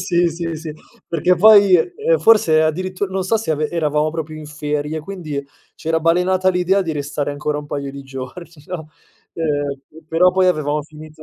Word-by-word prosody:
sì, 175 -1 +2
sì, 165 0 -4
sì, 155 0 -6 0.4
perché 170 +2 +2
poi, 200 0 +7
ehm, 435 - 0
forse 165 -8 +5
addirittur 185 +4 -2
non 190 0 -1
so 225 +4 +2
se 220 -5 -3
ave 155 0 0
eravamo 155 -2 0
proprio 160 -1 -5
in 155 - -9
ferie, 150 +1 -3
quindi 155 -5 -6 0.3
c'era 160 0 -1
balenata 180 +3 +2
l'idea 185 +2 +2
di 165 -3 -3
restare 145 0 -3
ancora 150 +1 -2
un 150 - -8
paio 140 -1 -4
di 140 0 -9
giorni 135 +6 -8 0.2
no, 160 -4 -7 0.4
ehm, 145 -1 -4
però 175 +3 +4
poi 185 0 +2
avevamo 150 -4 0
finito 155 +1 -13
160 Hz, 175 wpm, -19 LUFS, 150-180 Hz, 0.4 s, poi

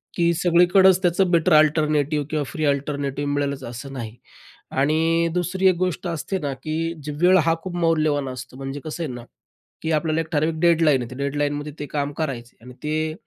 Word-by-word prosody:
की 170 -1 +2
सगळीकडंच 180 +2 +5
त्याचं 180 0 +2
better 170 0 +3
alternative 150 -1 +3
किंवा 155 -1 -1
फ्री 155 +3 -3
अल्टरनेटिव्ह 140 0 -1
मिळेलच 140 -1 -2
असं 125 +4 -7
नाही 115 -4 -6 0.6
आणि 165 +4 +2
दुसरी 180 +2 +1
एक 185 - +2
गोष्ट 180 0 -2
असते 170 +3 -3
ना 140 -4 -3
की 155 0 -3 0.3
जे 150 - -4
वेळ 185 +1 +6
हा 165 0 +2
खूप 185 -2 -5
मौल्यवान 155 -5 +1
असतो, 130 0 -8
म्हणजे 135 +1 -5
कसं 160 +2 -4
आहे 150 - -4
ना 120 -1 -8 0.6
की 160 - -2
आपल्याला 155 +1 +1
एक 160 - -7
ठराविक 155 +1 0
डेडलाईन 165 -5 +4
आहे 120 - -6
ते - - -7
डेडलाईनमध्ये 145 +1 -2
ते 145 - -3
काम 145 0 -2
करायचे 125 -7 -4
आणि 125 +2 -12
ते 155 +1 -1
155 Hz, 185 wpm, -23 LUFS, 140-170 Hz, 0.6 s, वेळ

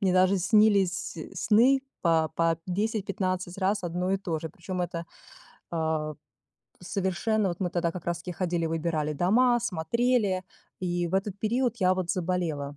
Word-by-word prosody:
мне 190 -2 +2
даже 185 +1 +4
снились 200 -3 +3 0.2
сны 245 +6 +4 0.2
по 160 -2 +3
по 165 -1 +2
10-15 190 -2 -2
раз 195 0 0
одно 180 +2 -1
и 195 - +1
то 175 -5 -2
же, 160 - -5
причём 180 0 -5
это, 170 -1 -4 0.7
э, 160 -2 -1 0.7
совершенно 195 +3 0
вот 175 +1 -4
мы 180 -2 0
тогда 170 -1 0
как 175 -2 -8
раз 170 0 -1
таки 180 +1 -6
ходили, 175 -1 -1
выбирали 160 -2 -1
дома, 240 - +3
смотрели 210 +1 +1 0.4
и 175 -1 -1
в 175 - -3
этот 195 0 -1
период 240 +3 0
я 185 0 +4
вот 185 -2 -2
заболела. 165 -6 -2
185 Hz, 155 wpm, -28 LUFS, 170-200 Hz, 0.7 s, даже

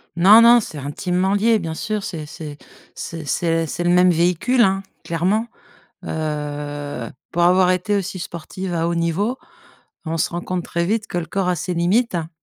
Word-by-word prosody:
Non, 200 +6 +8
non, 235 +1 +8
c'est 160 -8 -7
intimement 180 +7 -1
lié, 220 +2 +3
bien 165 -2 -4
sûr, 210 +2 -3
c'est 155 -4 -5
c'est 150 -2 -8 0.4
c'est 165 -2 -6
c'est 165 +3 0
c'est 175 - -3
le 175 - +1
même 180 0 +5
véhicule, 180 +9 +2
hein, 195 -2 +3 0.2
clairement, 190 +8 0 0.6
heu, 145 -4 -4 0.2
pour 175 - 0
avoir 180 +1 +5
été 200 +3 0
aussi 190 -1 -4
sportive 175 +2 -6
à 165 0 0
haut 170 - -1
niveau, 185 +9 0 0.7
on 165 +1 -2
se - - +1
rend 175 +1 -3
compte 180 -1 -3
très 170 0 -1
vite 220 +3 -1
que 175 - -4
le 165 - -4
corps 190 0 -1
a 180 - +1
ses 180 +3 -3
limites, 190 +5 +1
hein, 165 -1 -3
175 Hz, 190 wpm, -21 LUFS, 165-195 Hz, 0.7 s, Non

